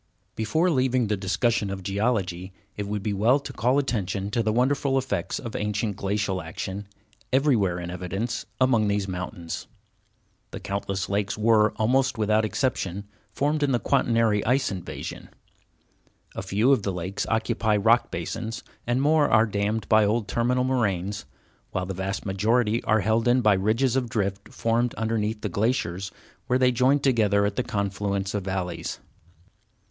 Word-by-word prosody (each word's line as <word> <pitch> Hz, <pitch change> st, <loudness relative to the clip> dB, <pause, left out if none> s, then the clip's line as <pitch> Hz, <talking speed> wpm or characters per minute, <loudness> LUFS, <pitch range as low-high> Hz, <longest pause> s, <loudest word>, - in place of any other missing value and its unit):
Before 160 Hz, +11 st, +1 dB
leaving 130 Hz, -3 st, +2 dB
the 105 Hz, -, +2 dB
discussion 100 Hz, +3 st, 0 dB
of 95 Hz, -1 st, -5 dB
geology, 95 Hz, -3 st, -1 dB, 0.2 s
it 105 Hz, -1 st, -4 dB
would 105 Hz, -1 st, -3 dB
be 105 Hz, -, -1 dB
well 110 Hz, +7 st, +4 dB
to 140 Hz, -, -8 dB
call 125 Hz, +4 st, +2 dB
attention 100 Hz, -7 st, -1 dB
to 120 Hz, -, +1 dB
the 110 Hz, -1 st, +1 dB
wonderful 135 Hz, +3 st, +1 dB
effects 135 Hz, 0 st, -2 dB
of 115 Hz, -3 st, -7 dB
ancient 105 Hz, 0 st, -1 dB
glacial 100 Hz, -1 st, -1 dB
action, 95 Hz, +5 st, -6 dB, 0.4 s
everywhere 125 Hz, -10 st, +2 dB
in 85 Hz, 0 st, -5 dB
evidence 95 Hz, +6 st, -4 dB
among 120 Hz, -5 st, +3 dB
these 100 Hz, -1 st, 0 dB
mountains. 90 Hz, -2 st, -5 dB, 0.8 s
The -, -, -7 dB
countless 100 Hz, -1 st, -3 dB
lakes 100 Hz, +1 st, -1 dB
were, 110 Hz, -1 st, +4 dB
almost 130 Hz, +4 st, +1 dB
without 110 Hz, 0 st, +2 dB
exception, 100 Hz, -5 st, -2 dB, 0.2 s
formed 150 Hz, +2 st, 0 dB
in 140 Hz, -2 st, +2 dB
the 120 Hz, -, +2 dB
Quaternary 115 Hz, -4 st, +2 dB
ice 130 Hz, +1 st, +1 dB
invasion. 95 Hz, -3 st, -7 dB, 1.0 s
A -, -, -4 dB
few 100 Hz, +7 st, +2 dB
of 135 Hz, -, +4 dB
the 100 Hz, -, -2 dB
lakes 90 Hz, +2 st, -3 dB
occupy 110 Hz, -1 st, +1 dB
rock 115 Hz, +4 st, +3 dB
basins, 115 Hz, +1 st, -4 dB, 0.2 s
and 125 Hz, +3 st, +1 dB
more 150 Hz, 0 st, +4 dB
are 110 Hz, +1 st, +5 dB
dammed 105 Hz, +1 st, -1 dB
by 110 Hz, -1 st, +5 dB
old 105 Hz, +1 st, +1 dB
terminal 125 Hz, +2 st, +1 dB
moraines, 105 Hz, -7 st, -1 dB, 0.4 s
while 90 Hz, -1 st, -2 dB
the 95 Hz, -, -4 dB
vast 95 Hz, +2 st, -3 dB
majority 110 Hz, +4 st, +1 dB
are 110 Hz, 0 st, +3 dB
held 110 Hz, +4 st, +1 dB
in 125 Hz, +1 st, +4 dB
by 105 Hz, -3 st, +5 dB
ridges 110 Hz, +7 st, +1 dB
of 125 Hz, -3 st, 0 dB
drift 100 Hz, -2 st, -2 dB
formed 115 Hz, +1 st, 0 dB
underneath 110 Hz, -1 st, -1 dB
the 105 Hz, -, -1 dB
glaciers 100 Hz, -3 st, -1 dB, 0.4 s
where 125 Hz, -, +3 dB
they 130 Hz, -1 st, +4 dB
joined 130 Hz, +3 st, +2 dB
together 105 Hz, -6 st, +3 dB
at 100 Hz, 0 st, -1 dB
the -, -, +1 dB
confluence 100 Hz, -3 st, -2 dB
of 105 Hz, -2 st, -2 dB
valleys. 90 Hz, -3 st, -3 dB
110 Hz, 160 wpm, -25 LUFS, 100-120 Hz, 1.0 s, are